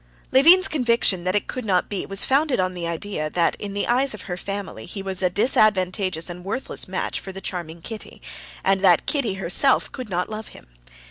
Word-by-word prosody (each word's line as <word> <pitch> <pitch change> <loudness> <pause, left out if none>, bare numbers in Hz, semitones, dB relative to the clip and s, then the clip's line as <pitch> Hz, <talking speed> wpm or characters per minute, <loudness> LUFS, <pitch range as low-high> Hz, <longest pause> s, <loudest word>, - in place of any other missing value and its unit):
Levin's 340 +8 +7
conviction 235 - +1
that 185 +2 0
it 205 - +1
could 255 - -5
not 190 -4 +1
be 200 -3 -4
was 195 0 -1
founded 275 -2 +2
on 185 0 0
the 175 -2 -4
idea 170 -2 -3
that 170 +1 +1
in 200 -1 -6
the 200 - 0
eyes 255 0 +2
of 205 - -10
her 180 - -4
family 195 - -6
he 195 - -6
was 190 -1 -3
a 180 - +3
disadvantageous 185 -4 +2
and 175 0 -7
worthless 210 +8 -2
match - - -2
for 190 - -8
the 190 - -8
charming 170 -3 -6
Kitty, 220 -2 -8 0.4
and 195 0 +2
that 180 -4 +4
Kitty 250 -10 0
herself 195 +9 +2
could 255 -5 -7
not 180 -1 -1
love 215 0 -7
him. - - -14
195 Hz, 205 wpm, -23 LUFS, 180-235 Hz, 0.4 s, Levin's